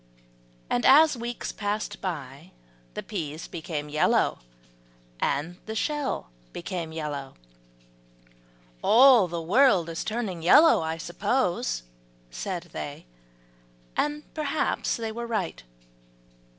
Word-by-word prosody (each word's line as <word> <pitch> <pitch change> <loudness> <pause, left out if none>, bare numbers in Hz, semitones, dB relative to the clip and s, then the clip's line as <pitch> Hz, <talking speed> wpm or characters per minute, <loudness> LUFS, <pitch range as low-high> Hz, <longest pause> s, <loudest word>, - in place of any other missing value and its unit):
And 120 - 0
as 300 +2 +7
weeks 240 0 -4
passed 210 0 -3
by, 155 -2 -6 0.4
the - - -4
peas 160 -6 -5
became 160 -3 -5
yellow, 150 +1 +2 0.8
and 160 - -1
the 220 - -4
shell 285 - -2 0.2
became 170 -2 -4
yellow. 145 -4 -5 1.5
"All 245 -4 +7
the 170 0 -4
world 195 -3 +4
is 165 - -4
turning 215 -6 -3
yellow, 295 - +6
I 160 0 -2
suppose," 175 - -1 0.5
said - - -5
they, - - -6 0.9
and 295 0 -1
perhaps 305 -1 -1
they 225 -1 -3
were 235 +1 -5
right. 210 - -2
185 Hz, 105 wpm, -26 LUFS, 160-235 Hz, 1.5 s, as